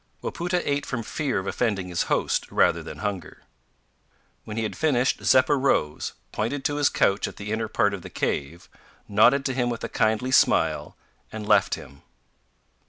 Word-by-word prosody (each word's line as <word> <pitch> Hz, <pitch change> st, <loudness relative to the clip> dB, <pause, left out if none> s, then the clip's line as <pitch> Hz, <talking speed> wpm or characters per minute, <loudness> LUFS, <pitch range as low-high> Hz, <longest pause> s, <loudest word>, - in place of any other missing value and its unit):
Wapoota 175 Hz, +1 st, -2 dB
ate 145 Hz, 0 st, 0 dB
from 120 Hz, -3 st, -4 dB
fear 145 Hz, +4 st, -2 dB
of 95 Hz, -, -3 dB
offending 100 Hz, -5 st, -1 dB
his 85 Hz, -2 st, -2 dB
host, -, -, 0 dB
rather -, -, +3 dB
than -, -, -8 dB
hunger. 95 Hz, -5 st, -5 dB, 1.0 s
When 105 Hz, 0 st, -7 dB
he 115 Hz, -, 0 dB
had 110 Hz, -, -3 dB
finished, 130 Hz, -5 st, +1 dB
Zeppa 130 Hz, +3 st, +4 dB
rose, 130 Hz, -, 0 dB, 0.2 s
pointed 135 Hz, +6 st, -3 dB
to 145 Hz, -, 0 dB
his 145 Hz, -1 st, +3 dB
couch 100 Hz, -, +1 dB
at -, -, -9 dB
the 105 Hz, +1 st, -6 dB
inner 110 Hz, 0 st, -1 dB
part -, -, +1 dB
of -, -, -5 dB
the -, -, -9 dB
cave, 75 Hz, +5 st, -3 dB, 0.4 s
nodded 120 Hz, +7 st, +4 dB
to 135 Hz, -, 0 dB
him 125 Hz, -1 st, 0 dB
with 115 Hz, -2 st, -4 dB
a -, -, -3 dB
kindly 110 Hz, +4 st, 0 dB
smile, -, -, +2 dB, 0.3 s
and 110 Hz, -1 st, -6 dB
left 105 Hz, -3 st, +4 dB
him. 70 Hz, 0 st, -13 dB
115 Hz, 175 wpm, -25 LUFS, 105-135 Hz, 1.0 s, Zeppa